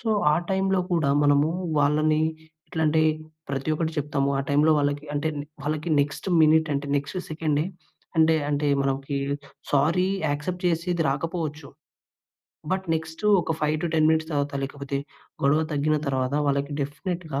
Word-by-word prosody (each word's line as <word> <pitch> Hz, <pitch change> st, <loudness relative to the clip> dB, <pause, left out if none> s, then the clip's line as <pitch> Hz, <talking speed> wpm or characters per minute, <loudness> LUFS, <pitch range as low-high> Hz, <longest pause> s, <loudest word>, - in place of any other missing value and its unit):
So 225 Hz, -, -1 dB, 0.2 s
ఆ -, -, +4 dB, 0.2 s
టైంలో 190 Hz, 0 st, +2 dB
కూడా 160 Hz, -5 st, +2 dB
మనము 145 Hz, +1 st, +4 dB, 0.3 s
వాళ్ళని 155 Hz, +2 st, +3 dB, 0.5 s
ఎట్లా 160 Hz, -, -2 dB
అంటే 155 Hz, +1 st, +3 dB, 0.5 s
ప్రతి 135 Hz, +1 st, -3 dB
ఒక్కటి 160 Hz, 0 st, -1 dB
చెప్తాము. 140 Hz, -1 st, 0 dB
ఆ -, -, +2 dB
టైంలో 150 Hz, +2 st, +4 dB
వాళ్ళకి 145 Hz, 0 st, 0 dB
అంటే 145 Hz, +2 st, 0 dB, 0.3 s
వాళ్ళకి 155 Hz, +3 st, -2 dB
నెక్స్ట్ 145 Hz, +5 st, -3 dB
మినిట్ 160 Hz, +1 st, +5 dB
అంటే 140 Hz, 0 st, -2 dB
నెక్స్ట్ 145 Hz, +6 st, -3 dB
సెకండే 155 Hz, -1 st, 0 dB, 0.5 s
అంటే 160 Hz, 0 st, +5 dB, 0.2 s
అంటే 145 Hz, 0 st, 0 dB, 0.2 s
మనకి 135 Hz, +1 st, -2 dB, 0.5 s
సారీ 160 Hz, +6 st, +3 dB, 0.2 s
యాక్సెప్ట్ 175 Hz, +5 st, -3 dB
చేసేది 170 Hz, 0 st, 0 dB
రాకపోవచ్చు. 155 Hz, 0 st, -3 dB, 1.0 s
బట్ 190 Hz, 0 st, 0 dB
నెక్స్ట్ 160 Hz, +2 st, -5 dB, 0.2 s
ఒక 165 Hz, -, -1 dB
5-10 155 Hz, +1 st, +1 dB
మినిట్స్ 160 Hz, 0 st, +2 dB
తర్వాత 145 Hz, -1 st, -1 dB
లేకపోతే 140 Hz, 0 st, -4 dB, 0.5 s
గొడవ 140 Hz, +3 st, +4 dB
తగ్గిన 150 Hz, +1 st, +1 dB
తర్వాత 130 Hz, 0 st, 0 dB
వాళ్ళకి 140 Hz, +1 st, 0 dB
డెఫినిట్‌గా 155 Hz, +1 st, -3 dB
150 Hz, 140 wpm, -25 LUFS, 145-160 Hz, 1.0 s, మినిట్